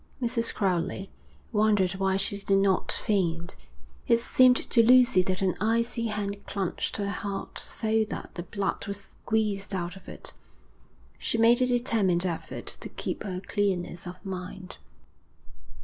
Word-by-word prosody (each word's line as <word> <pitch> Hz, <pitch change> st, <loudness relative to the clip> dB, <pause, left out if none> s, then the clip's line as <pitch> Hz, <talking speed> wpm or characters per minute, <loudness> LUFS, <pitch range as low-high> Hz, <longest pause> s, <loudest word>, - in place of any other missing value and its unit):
Mrs. 235 Hz, -2 st, 0 dB
Crowley 190 Hz, -1 st, -1 dB, 0.4 s
wondered 210 Hz, -4 st, +3 dB
why 190 Hz, 0 st, 0 dB
she 200 Hz, -, 0 dB
did 195 Hz, 0 st, +2 dB
not 195 Hz, -1 st, +2 dB
faint. 175 Hz, -5 st, 0 dB, 0.5 s
It 235 Hz, -1 st, +5 dB
seemed 255 Hz, +1 st, +5 dB, 0.2 s
to 235 Hz, -, +6 dB
Lucy 245 Hz, -5 st, +6 dB
that 185 Hz, +2 st, -1 dB
an 185 Hz, -2 st, +1 dB
icy 230 Hz, +2 st, +1 dB
hand 205 Hz, -1 st, -3 dB
clutched 195 Hz, -4 st, -2 dB
her 200 Hz, -1 st, -1 dB
heart 200 Hz, +1 st, -5 dB
so 220 Hz, 0 st, 0 dB
that 220 Hz, -, -7 dB
the 175 Hz, -, -5 dB
blood 195 Hz, +4 st, -3 dB
was 200 Hz, 0 st, -3 dB
squeezed 205 Hz, -1 st, -2 dB
out 175 Hz, 0 st, -3 dB
of 190 Hz, -1 st, -12 dB
it. -, -, -6 dB, 0.9 s
She -, -, -1 dB
made 235 Hz, +2 st, +5 dB
a 255 Hz, -, +4 dB
determined 220 Hz, -8 st, +2 dB
effort 170 Hz, -3 st, -4 dB
to -, -, -7 dB
keep -, -, -4 dB
her 185 Hz, -2 st, -4 dB
clearness 185 Hz, -3 st, -2 dB
of 175 Hz, -, -6 dB
mind. 185 Hz, 0 st, -7 dB
200 Hz, 150 wpm, -28 LUFS, 185-225 Hz, 0.9 s, to